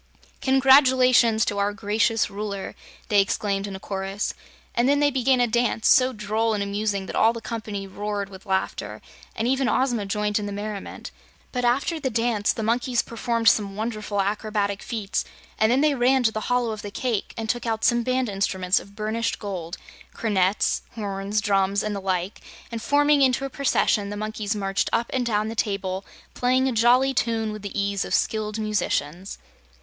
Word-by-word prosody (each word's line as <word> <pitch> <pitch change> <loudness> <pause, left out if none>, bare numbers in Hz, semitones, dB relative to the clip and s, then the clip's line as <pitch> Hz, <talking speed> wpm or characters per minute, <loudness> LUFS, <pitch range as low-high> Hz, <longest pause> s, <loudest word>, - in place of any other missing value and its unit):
"Congratulations 255 -4 +5
to 205 - -2
our 200 +1 +1
gracious 215 +1 +1
Ruler!" 200 -1 -5 0.4
they 205 -2 +5
exclaimed 200 0 -1
in 195 - -6
a - - -7
chorus, 195 +1 -3 0.4
and 240 +3 +2
then 285 0 +3
they 290 0 +3
began 260 -1 +2
a 245 - +4
dance, 235 -1 +1
so 255 0 +5
droll 215 0 -1
and 200 - -1
amusing 200 -1 -2
that - - -6
all 225 +1 +4
the 230 - -6
company 215 -4 -5
roared 205 +1 -4
with 195 +1 -13
laughter 190 0 -2 0.4
and 225 - -1
even 265 0 +1
Ozma 240 -6 0
joined 210 +1 0
in 205 - -4
the - - -4
merriment. 205 0 -6 0.4
But 250 -1 -1
after 275 +7 +1
the 270 -3 -1
dance 230 -3 +1
the 225 - -4
monkeys 240 +2 +1
performed 230 0 -2
some 200 -1 +3
wonderful 215 -2 -3
acrobatic 205 0 -1
feats, 215 -4 -2 0.4
and 220 +1 +4
then 260 +3 +3
they 300 -1 +3
ran 260 0 +3
to 220 - +3
the 215 - -3
hollow 245 -2 +1
of 215 -1 -5
the 205 - -6
cake 225 0 -3
and 225 -1 -3
took 240 +1 -2
out 225 -1 -1
some 240 -1 +3
band 255 +1 0
instruments 195 -2 +1
of 200 +1 -15
burnished 220 +2 -2
gold 185 -4 -5 0.4
cornets, 200 -3 +1
horns, 200 -1 -2
drums, 200 0 +1
and 215 -1 -2
the 200 - -4
like 185 +1 -2 0.3
and 230 -1 -4
forming 290 +2 +3
into 265 0 +3
a 275 - -6
procession 220 -7 +1
the 205 - -5
monkeys 215 0 -3
marched 195 -1 -1
up 230 +1 0
and 250 -2 0
down 210 -1 0
the 225 - -4
table 195 -3 -2 0.3
playing 255 +1 +2
a - - +1
jolly 245 +4 +4
tune 225 -4 0
with 215 0 -7
the 205 0 -4
ease 200 0 0
of - - -1
skilled 215 -1 -1
musicians. 195 -5 -2
215 Hz, 185 wpm, -24 LUFS, 200-240 Hz, 0.4 s, Congratulations